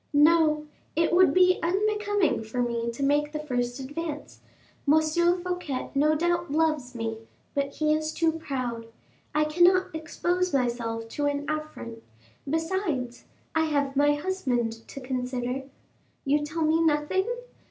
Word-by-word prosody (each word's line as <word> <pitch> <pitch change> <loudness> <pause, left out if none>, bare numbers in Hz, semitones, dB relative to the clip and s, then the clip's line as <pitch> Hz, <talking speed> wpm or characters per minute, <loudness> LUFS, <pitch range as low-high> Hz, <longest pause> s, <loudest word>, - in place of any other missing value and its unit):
No, 305 0 +4 0.3
it 330 +1 +2
would 365 +1 +6
be 365 0 +4
unbecoming 410 - +1
for 220 +3 -5
me 235 -1 -1
to 235 +4 -4
make 295 +1 +2
the 300 - -4
first 245 -3 -2
advance. 295 +3 -6 0.5
M. 315 - +7
Fouquet 345 -2 0
no 300 +2 +3
doubt 345 0 0
loves 300 -5 0
me, 225 -1 -3 0.3
but 280 0 -1
he 305 0 +2
is 310 0 -1
too 325 0 +2
proud. 255 -7 -4 0.5
I 305 - +4
cannot 360 +3 +4
expose 350 +2 -1
myself 235 -3 -1
to 290 +4 -1
an 285 0 -2
affront.... 305 -7 -5 0.5
besides, 325 -6 -2 0.3
I 320 0 +2
have 285 -3 0
my 290 +1 +4
husband 280 -9 -1
to - - -8
consider. 255 0 -3 0.6
You 290 +2 +2
tell 315 +2 -2
me 315 +1 +3
nothing? 320 +5 +1
300 Hz, 140 wpm, -27 LUFS, 260-335 Hz, 0.6 s, M